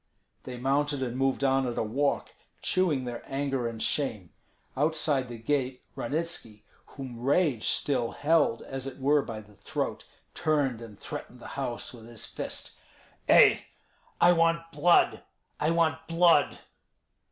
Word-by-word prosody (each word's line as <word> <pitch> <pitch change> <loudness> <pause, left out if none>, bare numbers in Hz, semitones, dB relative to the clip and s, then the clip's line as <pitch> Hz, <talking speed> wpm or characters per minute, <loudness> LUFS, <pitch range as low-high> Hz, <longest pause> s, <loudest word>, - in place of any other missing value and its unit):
They 125 -1 -6
mounted, 140 +2 0
and 120 -1 -3
moved 135 +1 0
on 135 -1 +3
at 120 - -4
a - - +1
walk, 140 +6 -1 0.3
chewing 160 -9 +1
their 120 -1 -5
anger 135 -3 -1
and 115 -1 -6
shame. 110 - -1 0.4
Outside 145 -3 +1
the 120 - -6
gate 130 +1 -1
Ranitski, 140 -7 -3 0.2
whom 130 -4 -8
rage 135 -1 +2
still 125 -5 0
held 145 -6 +2
as 135 0 -6
it 135 - -7
were 145 +2 +3
by 110 -5 -6
the 105 0 -18
throat, 100 - -4 0.3
turned 140 -7 0
and 110 -4 -11
threatened 125 - -8
the - - -9
house 130 -3 -4
with 115 -2 -12
his 115 -2 -7
fist. - - -6 0.5
"Ei! - - +7 0.6
I 175 - +7
want 165 -1 +2
blood! 165 +4 +4 0.4
I 150 - +1
want 160 -1 +1
blood!" 165 -3 +4
135 Hz, 145 wpm, -28 LUFS, 120-150 Hz, 0.6 s, Ei